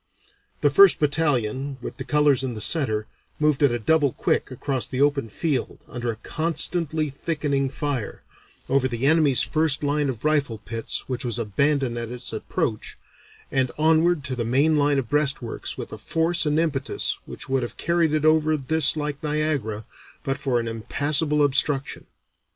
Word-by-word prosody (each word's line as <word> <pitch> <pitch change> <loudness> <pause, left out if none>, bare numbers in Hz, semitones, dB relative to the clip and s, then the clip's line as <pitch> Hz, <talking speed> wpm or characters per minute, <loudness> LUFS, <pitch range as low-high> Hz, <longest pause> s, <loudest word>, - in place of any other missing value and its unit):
The - - +3
first 395 -1 +6
battalion, 140 -3 0
with - - -8
the - - -5
colors 150 -3 +3
in 125 -3 -3
the - - -6
center, 110 -6 +2 0.3
moved 150 -2 +2
at 140 -3 +4
a 120 - 0
double 140 +3 +2
quick - - 0
across 130 0 -2
the 130 - -4
open 140 -4 +1
field 140 +2 -3
under 120 0 -4
a 115 - -2
constantly 160 +2 0
thickening 140 -2 -2
fire, 135 -5 -4 0.4
over 135 -1 +2
the 120 0 -3
enemy's 150 -3 +5
first 155 -2 0
line 145 0 0
of 125 +1 -6
rifle 145 -7 +1
pits 110 +2 -5
which 130 0 -3
was 120 -2 -3
abandoned 120 +3 0
at 115 -1 -5
its 125 -1 -6
approach, 110 0 -3 0.5
and 130 -2 +1
onward 160 +1 +3
to 130 -1 -2
the 120 - -2
main 140 +7 +2
line 145 -1 +2
of 135 -4 -2
breastworks 140 -4 -1
with - - -7
a - - -8
force 165 0 0
and 150 +1 +2
impetus 145 -5 -2
which - - -9
would 135 0 0
have 120 - -6
carried 170 -2 +1
it 155 0 0
over 155 0 +3
this 155 +3 +2
like 150 -1 -4
Niagara 150 -9 -2 0.4
but 135 0 -2
for 125 -3 0
an 115 - -4
impassable 145 +6 +1
obstruction. 140 0 0
140 Hz, 170 wpm, -24 LUFS, 125-155 Hz, 0.5 s, first